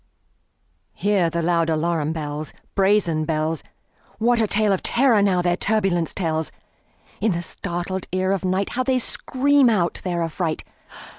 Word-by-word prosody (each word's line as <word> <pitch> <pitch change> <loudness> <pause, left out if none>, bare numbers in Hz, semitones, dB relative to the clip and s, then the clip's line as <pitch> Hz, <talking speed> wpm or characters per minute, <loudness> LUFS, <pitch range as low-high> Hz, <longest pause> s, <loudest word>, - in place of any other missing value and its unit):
Hear 195 -3 +1
the 170 0 -2
loud 165 -1 +1
alarum 160 -1 0
bells, 150 -1 -5 0.2
Brazen 190 -5 +2
bells! 155 +1 -1 0.6
What 235 +1 +2
a 220 - +2
tale 210 0 +2
of 190 - -1
terror, 240 -4 +3
now, 185 -3 +2
their 175 0 +2
turbulency 190 -5 0
tells! 160 -4 -2 0.7
In 215 -1 +1
the 170 0 -3
startled 175 +2 -4
ear 185 +1 0
of 195 - 0
nightHow 190 +7 -1
they 260 0 +1
scream 270 +2 +2
out 180 -6 0
their 175 -2 -1
affright! 165 0 -2
180 Hz, 145 wpm, -22 LUFS, 165-210 Hz, 0.7 s, terror